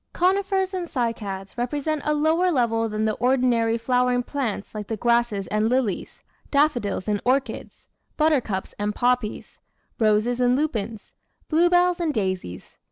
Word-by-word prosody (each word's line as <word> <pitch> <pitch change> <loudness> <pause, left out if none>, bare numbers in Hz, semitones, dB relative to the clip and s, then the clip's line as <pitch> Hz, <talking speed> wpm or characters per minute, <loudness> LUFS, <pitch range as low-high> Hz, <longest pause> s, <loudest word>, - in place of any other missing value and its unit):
Conifers 380 +1 +1
and 360 -2 -3
Cycads 210 -8 -3
represent 290 +5 -1
a 300 - +2
lower 320 +4 +2
level 225 -5 +1
than 215 0 -1
the 215 - +1
ordinary 245 -2 +2
flowering 250 +1 +1
plants 245 -7 -4
like 210 -2 -6
grasses 235 -4 +1
and 215 +1 +1
lilies, 245 -7 -2 0.3
daffodils 255 -10 +1
and 210 -1 0
orchids, 265 +2 -2 0.3
buttercups 270 -11 0
and 205 0 -1
poppies, 245 -3 -1 0.4
roses 220 +2 +2
and 245 0 +3
lupins, 230 -7 -3 0.4
bluebells 350 +2 +3
and 325 -4 -1
daisies. 185 - -4
245 Hz, 130 wpm, -24 LUFS, 215-300 Hz, 0.4 s, and